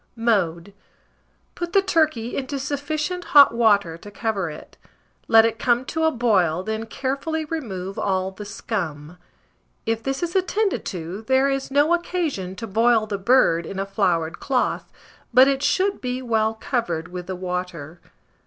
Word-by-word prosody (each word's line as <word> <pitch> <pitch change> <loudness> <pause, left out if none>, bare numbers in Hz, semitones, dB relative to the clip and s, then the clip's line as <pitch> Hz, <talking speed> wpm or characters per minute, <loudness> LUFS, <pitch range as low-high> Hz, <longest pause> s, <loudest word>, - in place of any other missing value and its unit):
] - - -43 0.2
Mode. 170 -1 -2 0.8
Put 345 -1 -5
the 395 - +5
turkey 310 -11 +1
into 275 +1 -3
sufficient 300 +5 -3
hot 280 -5 +9
water 205 -8 +2
to 205 - -11
cover 200 -4 -2
it; 150 - -11 0.5
let 225 0 +7
it 230 0 -1
come 245 0 +2
to 320 +4 -1
a 320 - +3
boil, 185 - +1
then 220 +2 -4
carefully 280 +6 -3
remove 195 - -5
all 190 -1 0
the 200 +2 -9
scum: 175 -6 -5 0.7
if 225 -1 -1
this 270 +6 -3
is 345 +1 -3
attended 390 +2 0
to, 180 +1 -5
there 265 +1 +3
is 270 0 -2
no 290 +4 +3
occasion 320 - -2
to 230 - -6
boil 225 +1 +3
the 205 -2 -4
bird 190 -7 +3
in 195 - -6
a 195 - -1
floured 175 -5 0
cloth; 260 -2 -1 0.4
but 260 +1 +8
it 275 -1 +1
should 390 +6 +1
be 250 0 -2
well 225 -3 0
covered 180 - -2
with 180 0 -7
the 190 - -4
water. 180 -3 -5
225 Hz, 160 wpm, -23 LUFS, 185-275 Hz, 0.8 s, hot